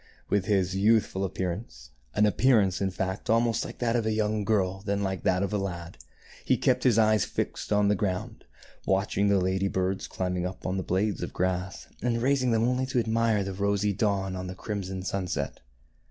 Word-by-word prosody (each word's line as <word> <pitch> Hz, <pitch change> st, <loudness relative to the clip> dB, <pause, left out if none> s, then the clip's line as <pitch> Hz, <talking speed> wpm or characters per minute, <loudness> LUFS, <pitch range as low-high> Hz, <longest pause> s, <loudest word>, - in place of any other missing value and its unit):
With 100 Hz, -2 st, +2 dB
his 95 Hz, -2 st, +1 dB
youthful 100 Hz, -1 st, +2 dB
appearance, 90 Hz, -, -4 dB
— -, -, -32 dB
an 105 Hz, -, +4 dB
appear 120 Hz, +3 st, +4 dB
ance, 95 Hz, -2 st, 0 dB
in 95 Hz, -, +1 dB
fact, 95 Hz, +1 st, -4 dB
almost 115 Hz, 0 st, +2 dB
more -, -, -6 dB
like -, -, -10 dB
that 120 Hz, -1 st, 0 dB
of 120 Hz, -, +2 dB
a -, -, +1 dB
young 110 Hz, -1 st, 0 dB
girl 95 Hz, -3 st, 0 dB
than 100 Hz, 0 st, -1 dB
like 95 Hz, -1 st, -2 dB
that 90 Hz, +1 st, +2 dB
of 100 Hz, -, -2 dB
a 105 Hz, -, +1 dB
lad, 85 Hz, -6 st, -5 dB, 0.2 s
— -, -, -21 dB
he -, -, +2 dB
kept 125 Hz, -1 st, +2 dB
his 120 Hz, -4 st, +4 dB
eyes 110 Hz, -2 st, +4 dB
fixed -, -, -4 dB
on 105 Hz, -1 st, +3 dB
the 105 Hz, -, +4 dB
ground, 95 Hz, -2 st, -3 dB, 0.4 s
watching 95 Hz, +1 st, +1 dB
the 100 Hz, 0 st, +4 dB
lady 95 Hz, +1 st, 0 dB
birds 95 Hz, 0 st, -1 dB
climbing 90 Hz, -1 st, -2 dB
up 90 Hz, +2 st, -5 dB
the -, -, -3 dB
blades 95 Hz, +2 st, 0 dB
of -, -, -4 dB
grass, 95 Hz, +1 st, -2 dB, 0.2 s
and 115 Hz, -1 st, 0 dB
raising 130 Hz, -1 st, +2 dB
them 115 Hz, -1 st, +2 dB
only 125 Hz, +2 st, +1 dB
to 130 Hz, -, -2 dB
admire 115 Hz, -2 st, +1 dB
the 95 Hz, 0 st, -4 dB
rosy 100 Hz, +1 st, +1 dB
dawn 100 Hz, -2 st, 0 dB
or 90 Hz, -, -4 dB
the 90 Hz, 0 st, -6 dB
crimson 95 Hz, -2 st, -4 dB
sunset. 95 Hz, -1 st, -3 dB
100 Hz, 210 wpm, -27 LUFS, 95-110 Hz, 0.4 s, an